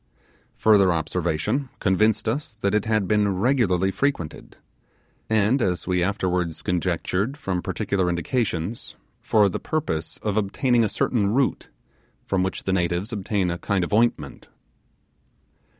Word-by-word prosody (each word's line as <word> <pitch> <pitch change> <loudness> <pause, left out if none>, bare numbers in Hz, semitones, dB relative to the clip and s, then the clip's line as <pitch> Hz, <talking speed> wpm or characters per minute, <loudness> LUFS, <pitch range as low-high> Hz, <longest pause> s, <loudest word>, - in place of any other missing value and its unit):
Further 100 -4 +4
observation 85 - -1
convinced 105 +3 +2
us 120 0 -2
that 100 -2 -1
it 105 -1 +1
had 110 -3 +1
been 105 -2 +2
regularly 95 -5 +2
frequented, 135 - -3 0.7
and, 110 +4 +2
as 90 -5 0
we 90 -1 0
afterwards 90 -4 -1
conjectured 90 - -1
from 90 -7 -2
particular 95 0 -1
indications, 90 +2 -2 0.2
for 105 -2 +3
the 95 - -3
purpose 85 - -3
of 105 -1 -1
obtaining 115 +4 +2
a 110 - +1
certain 100 -3 0
root, 135 -1 0 0.6
from 95 -1 0
which 95 +1 -2
the 95 - -1
natives 90 +4 -1
obtained 100 -3 -1
a 85 - -4
kind 100 -3 0
of 85 - -4
ointment. 105 -10 0
100 Hz, 135 wpm, -24 LUFS, 90-110 Hz, 0.7 s, Further